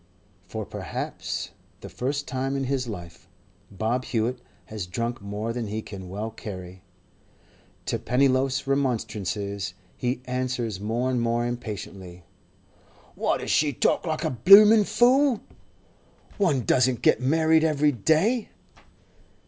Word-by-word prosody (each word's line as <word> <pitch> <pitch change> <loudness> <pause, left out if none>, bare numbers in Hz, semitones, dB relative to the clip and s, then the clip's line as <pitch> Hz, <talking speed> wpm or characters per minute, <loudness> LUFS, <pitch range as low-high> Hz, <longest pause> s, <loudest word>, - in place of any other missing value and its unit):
For - - -5
perhaps - - -5 0.3
the - - -8
first 140 +3 -3
time 130 +1 -2
in 135 - -1
his 130 -1 -1
life 85 -6 -9 0.4
Bob 115 +6 -2
Hewett 120 +2 -1 0.2
has 105 -5 -6
drunk 115 +5 -3
more 105 +3 -4
than 120 -2 -3
he 110 +1 -4
can 95 -3 -9
well 105 +4 -4
carry. 95 -4 -8 1.0
To - - -1
Pennyloaf's 130 +2 +1
remonstrances 105 -7 -2 0.2
he 125 0 -2
answers 125 -5 -2
more 115 +5 -1
and 125 -2 0
more 120 0 0
impatiently: 100 -6 -6 0.9
'Why - - 0
does - - -4
she 145 -2 +2
talk 150 - +1
like 155 -1 -2
a - - 0
bloomin' 205 - +8
fool?—one 240 - 0
doesn't 125 0 +2
get - - +4
married 160 +4 +3
every 150 -2 +3
day. 160 - +1
125 Hz, 125 wpm, -25 LUFS, 105-140 Hz, 1.0 s, bloomin